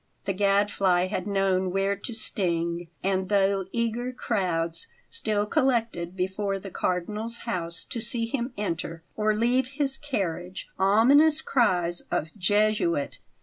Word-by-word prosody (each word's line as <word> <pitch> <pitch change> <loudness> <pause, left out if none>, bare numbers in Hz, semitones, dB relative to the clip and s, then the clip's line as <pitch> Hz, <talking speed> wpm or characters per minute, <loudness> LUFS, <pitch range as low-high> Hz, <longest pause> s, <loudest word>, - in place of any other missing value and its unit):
The 195 - 0
Gadfly 195 -2 +2
had 190 -1 -3
known 195 -2 +1
where 195 +2 +1
to 200 +5 -3
sting; 170 -6 -1 0.2
and, 190 -1 0
though 195 -1 +2
eager 235 +1 -1
crowds 170 -9 -1 0.2
still 215 - +1
collected 225 - 0
before 195 +2 -1
the 195 0 -9
Cardinal's 210 +8 -2
house 170 -6 -3
to 230 - -4
see 230 0 0
him 240 +2 -2
enter 165 -4 -3
or 215 0 +1
leave 245 +4 +2
his 275 -3 -1
carriage, 185 - -3
ominous 270 +11 +5
cries 180 - +2
of 155 - -1
"Jesuit!" 205 -5 +1
200 Hz, 130 wpm, -26 LUFS, 180-230 Hz, 0.2 s, ominous